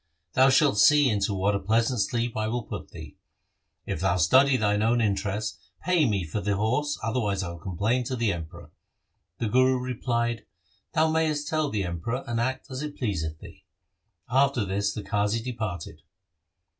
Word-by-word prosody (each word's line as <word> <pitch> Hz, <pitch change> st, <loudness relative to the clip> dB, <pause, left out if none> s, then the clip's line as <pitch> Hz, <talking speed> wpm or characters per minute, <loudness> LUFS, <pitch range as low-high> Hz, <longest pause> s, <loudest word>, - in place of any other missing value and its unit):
Thou 130 Hz, +1 st, +5 dB
shalt 135 Hz, -5 st, +4 dB
see 145 Hz, +3 st, +6 dB
into 100 Hz, -1 st, 0 dB
what 100 Hz, +2 st, +1 dB
a 100 Hz, -, 0 dB
pleasant 115 Hz, +4 st, +1 dB
sleep 120 Hz, +2 st, -1 dB
I 110 Hz, 0 st, -1 dB
will 120 Hz, +1 st, -2 dB
put -, -, -7 dB
thee. -, -, -11 dB, 0.7 s
If -, -, -3 dB
thou -, -, +1 dB
study 130 Hz, -, +5 dB
thine 105 Hz, -1 st, +1 dB
own 115 Hz, +2 st, +2 dB
interests, 105 Hz, 0 st, -1 dB, 0.2 s
pay 175 Hz, -7 st, +3 dB
me 100 Hz, -3 st, 0 dB
for 85 Hz, +6 st, -4 dB
the 100 Hz, +1 st, 0 dB
horse, 125 Hz, +8 st, 0 dB
otherwise 105 Hz, -4 st, -1 dB
I 85 Hz, -, -4 dB
will 85 Hz, 0 st, -8 dB
complain 100 Hz, +9 st, -1 dB
to 130 Hz, -, -2 dB
the 115 Hz, -4 st, +1 dB
Emperor.' 85 Hz, +1 st, -9 dB, 0.7 s
The 115 Hz, -, -2 dB
Guru 130 Hz, +3 st, +3 dB
replied, 120 Hz, -2 st, -2 dB, 0.2 s
' -, -, -40 dB
Thou 160 Hz, 0 st, +3 dB
mayest 155 Hz, -2 st, 0 dB
tell 155 Hz, -2 st, 0 dB
the 105 Hz, -5 st, -1 dB
Emperor 90 Hz, +9 st, -3 dB
and 120 Hz, -2 st, -2 dB
act 130 Hz, +2 st, -3 dB
as 130 Hz, +1 st, -4 dB
it 150 Hz, -1 st, -6 dB
please 105 Hz, -, -1 dB
th 80 Hz, -1 st, -4 dB
thee.' -, -, -14 dB, 0.6 s
After 135 Hz, -3 st, +2 dB
this 100 Hz, +1 st, -1 dB
the 105 Hz, -, -6 dB
Qazi 105 Hz, +2 st, 0 dB
departed. 110 Hz, -8 st, -5 dB
115 Hz, 180 wpm, -26 LUFS, 100-130 Hz, 0.7 s, see